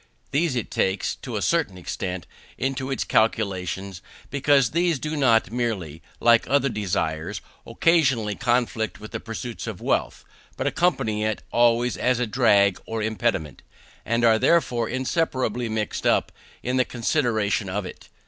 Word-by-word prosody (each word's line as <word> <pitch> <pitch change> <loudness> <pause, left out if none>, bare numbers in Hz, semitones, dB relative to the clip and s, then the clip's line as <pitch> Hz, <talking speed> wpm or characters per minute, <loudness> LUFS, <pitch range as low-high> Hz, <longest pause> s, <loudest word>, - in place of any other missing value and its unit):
These 145 0 +1
it 120 - -3
takes, 95 +1 0
to 120 -4 -7
a 100 - -2
certain 160 - +1
extent, 90 0 -4 0.3
into 135 +1 -2
its 135 - -1
calculations, 95 -4 0 0.3
because 140 -3 +3
these 170 -1 +2
do 155 +4 -4
not 115 -7 +3
merely, 100 -10 -3 0.2
like 115 -1 +4
other 140 0 +3
desires, 85 -4 -2 0.3
occasionally 130 -5 +2
conflict 120 -2 0
with 110 0 -10
the - - -4
pursuit 115 +1 -6
of 105 -5 -5
wealth, - - -1 0.3
but - - -2
accompany 110 -12 +1
it 110 0 -2
always 120 +1 +3
as 125 -1 +1
a 125 - +1
drag, 100 -5 +3
or 110 -1 -3
impediment, 110 - -1 0.4
and 115 +1 +1
are 110 -1 +5
therefore 120 -8 +2
inseparably 130 -4 -1
mixed 110 -1 -2
up - - +2 0.3
in 125 +1 0
the 130 - +3
consideration 115 -5 0
of 100 +1 -2
it. - - -10
115 Hz, 150 wpm, -24 LUFS, 105-130 Hz, 0.4 s, are